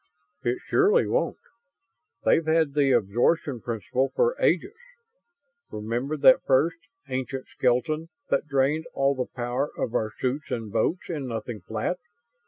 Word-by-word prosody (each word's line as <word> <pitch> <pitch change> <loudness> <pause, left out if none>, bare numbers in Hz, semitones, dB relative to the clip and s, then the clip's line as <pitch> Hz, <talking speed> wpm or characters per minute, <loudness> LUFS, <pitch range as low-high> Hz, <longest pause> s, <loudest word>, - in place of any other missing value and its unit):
"It 120 -1 0
surely 415 +4 +4
won't. - - 0 0.9
They've 165 - +3
had 160 -3 +2
the 140 -2 +3
absorption 120 - +1
principle 125 +4 -1
for 485 +1 +2
ages. 385 +3 +2 1.0
Remember 120 +8 -3
that 255 - +7
first, 145 +6 +2 0.3
ancient 130 0 -3
skeleton 155 +6 0 0.2
that - - +1
drained 145 +3 +1
all 140 0 +3
the 130 -2 -3
power 125 +3 -1
of 115 - -2
our 110 0 0
suits 135 +3 -2
and 115 -3 -4
boats 175 - 0
in 150 -6 -4
nothing 115 -2 -5
flat? 110 - -3
135 Hz, 135 wpm, -26 LUFS, 120-160 Hz, 1.0 s, that